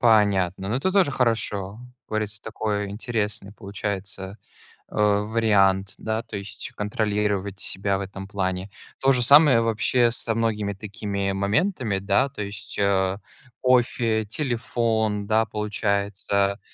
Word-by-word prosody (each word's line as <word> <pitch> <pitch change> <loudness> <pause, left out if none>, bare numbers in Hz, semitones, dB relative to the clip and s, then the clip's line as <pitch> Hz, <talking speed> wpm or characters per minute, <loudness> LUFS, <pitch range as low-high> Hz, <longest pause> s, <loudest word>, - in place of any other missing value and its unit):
Понятно, 100 -5 +3
но 110 - 0
это 170 +8 0
тоже 190 -7 +4
хорошо, 105 -5 0 0.2
как - - -72
говорится, 110 -1 -2
такой 105 -2 -2
интересный 105 -2 -3
получается, 100 -1 -5 0.5
э, - - -16
вариант. 105 -2 +2
Да, 110 +1 -2
то 105 - -7
есть, 100 -1 -6
контролировать 105 -2 -1
себя 100 0 -1
в - - -5
этом 95 0 -7
плане. 95 -1 -2 0.3
То 135 0 +4
же 125 - +2
самое 140 -2 +7
вообще 115 +2 +2
со 115 -1 -1
многими 105 -3 0
такими 100 0 -3
моментами, 105 - 0
да, 100 +7 +2
то 130 - -6
есть, 100 0 -7
э, 95 -1 +2 0.4
кофе, 120 -3 +2
телефон, 110 -4 -1
да, 110 +2 +3
получается, 100 -1 -1
105 Hz, 130 wpm, -24 LUFS, 100-115 Hz, 0.5 s, самое